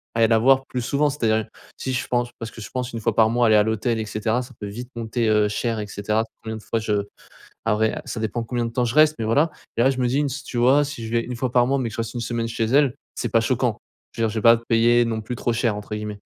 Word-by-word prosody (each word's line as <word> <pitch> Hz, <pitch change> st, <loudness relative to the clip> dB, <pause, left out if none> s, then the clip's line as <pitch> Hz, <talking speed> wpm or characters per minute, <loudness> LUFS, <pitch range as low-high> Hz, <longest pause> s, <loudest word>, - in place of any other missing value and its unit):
aller 115 Hz, -1 st, +4 dB
la 115 Hz, 0 st, +4 dB
voir 135 Hz, +3 st, +4 dB
plus 125 Hz, -, -3 dB
souvent. 140 Hz, +5 st, +1 dB
C'est-à-dire 110 Hz, -6 st, 0 dB, 0.3 s
si, 130 Hz, -, -3 dB
je 125 Hz, -, -1 dB
pense, 120 Hz, -1 st, 0 dB
parce 115 Hz, 0 st, -6 dB
que -, -, -12 dB
je -, -, -8 dB
pense 125 Hz, -1 st, -3 dB
1 115 Hz, -, -3 dB
fois 115 Hz, 0 st, 0 dB
par 110 Hz, -1 st, +5 dB
mois 120 Hz, 0 st, +3 dB
aller 110 Hz, -, +5 dB
à 105 Hz, -, +6 dB
l'hôtel 110 Hz, +2 st, 0 dB
et 110 Hz, -, -2 dB
cetera 110 Hz, +3 st, -1 dB
ça -, -, -13 dB
peut 105 Hz, -, -5 dB
vite 120 Hz, +5 st, -7 dB
monter, 115 Hz, 0 st, -1 dB
heu, 105 Hz, -1 st, +3 dB
cher 115 Hz, +1 st, -2 dB
et 105 Hz, -, -4 dB
cetera 105 Hz, +2 st, -1 dB, 0.2 s
combien 110 Hz, 0 st, -5 dB
de 110 Hz, -, -11 dB
fois -, -, -2 dB
je 105 Hz, -2 st, 0 dB, 0.6 s
après, 110 Hz, 0 st, +2 dB
heu, -, -, -4 dB
ça 115 Hz, -, -4 dB
dépend 110 Hz, +2 st, -2 dB
combien 120 Hz, 0 st, -2 dB
de -, -, -4 dB
temps, 125 Hz, +1 st, +1 dB
je 120 Hz, 0 st, -2 dB
reste, 155 Hz, 0 st, +5 dB
mais 110 Hz, -, -2 dB
voilà 145 Hz, +9 st, +3 dB, 0.3 s
et 115 Hz, -, +3 dB
là, 130 Hz, -, +5 dB
je 130 Hz, -, -3 dB
me 125 Hz, -, +2 dB
dis 135 Hz, +4 st, +1 dB
une 150 Hz, -, +2 dB
s 140 Hz, +1 st, -5 dB
tu 120 Hz, -, -5 dB
vois? 130 Hz, +5 st, +5 dB
Si 140 Hz, -5 st, -6 dB
je -, -, -6 dB
vais 115 Hz, -, +3 dB
1 125 Hz, -, -5 dB
fois 130 Hz, +1 st, -2 dB
par 125 Hz, -1 st, +4 dB
mois, 135 Hz, +2 st, +1 dB
mais 125 Hz, -3 st, -1 dB
que -, -, -10 dB
je -, -, -3 dB
reste 115 Hz, +1 st, -4 dB
une 120 Hz, -, -3 dB
semaine 115 Hz, 0 st, -2 dB
chez 115 Hz, 0 st, -1 dB
elle, 135 Hz, +2 st, +3 dB, 0.2 s
c'est 120 Hz, -, -2 dB
pas 115 Hz, -, +4 dB
choquant. 120 Hz, -1 st, 0 dB, 0.3 s
Je 115 Hz, -, -4 dB
veux -, -, +3 dB
dire, -, -, -3 dB
je 110 Hz, -, -3 dB
vais -, -, -9 dB
pas 115 Hz, 0 st, +7 dB
payer 120 Hz, +1 st, +4 dB
non 110 Hz, -1 st, -2 dB
plus 120 Hz, +3 st, -5 dB
trop 120 Hz, -, -1 dB
cher 115 Hz, -2 st, 0 dB
entre 105 Hz, +1 st, -6 dB
guillemets. 105 Hz, -1 st, -5 dB
115 Hz, 310 wpm, -23 LUFS, 110-125 Hz, 0.6 s, pas